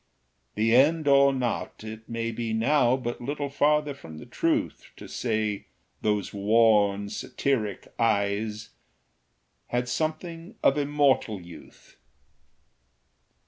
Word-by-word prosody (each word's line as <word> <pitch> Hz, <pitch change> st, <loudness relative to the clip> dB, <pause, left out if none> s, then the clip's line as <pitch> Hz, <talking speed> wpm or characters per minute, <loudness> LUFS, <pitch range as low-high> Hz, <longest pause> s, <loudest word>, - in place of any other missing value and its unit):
The 115 Hz, +2 st, +3 dB
end 150 Hz, +4 st, +4 dB
or 140 Hz, 0 st, +6 dB
not, 125 Hz, -4 st, -3 dB
it 110 Hz, 0 st, -9 dB
may 115 Hz, 0 st, -2 dB
be 115 Hz, 0 st, -3 dB
now 125 Hz, +2 st, +3 dB
But 120 Hz, -2 st, -5 dB
little 145 Hz, +3 st, -3 dB
farther 150 Hz, +1 st, +2 dB
from 80 Hz, -, -11 dB
the -, -, -10 dB
truth -, -, -1 dB
To -, -, -10 dB
say 110 Hz, -4 st, -2 dB, 0.3 s
those 105 Hz, -2 st, -1 dB
worn 105 Hz, -1 st, +3 dB
satiric 110 Hz, -2 st, -2 dB
eyes 105 Hz, 0 st, 0 dB, 1.0 s
Had 125 Hz, 0 st, -1 dB
something 165 Hz, -, -3 dB
of 135 Hz, -, +5 dB
immortal 140 Hz, -7 st, +1 dB
youth. 85 Hz, -1 st, -15 dB
115 Hz, 110 wpm, -26 LUFS, 110-140 Hz, 1.0 s, or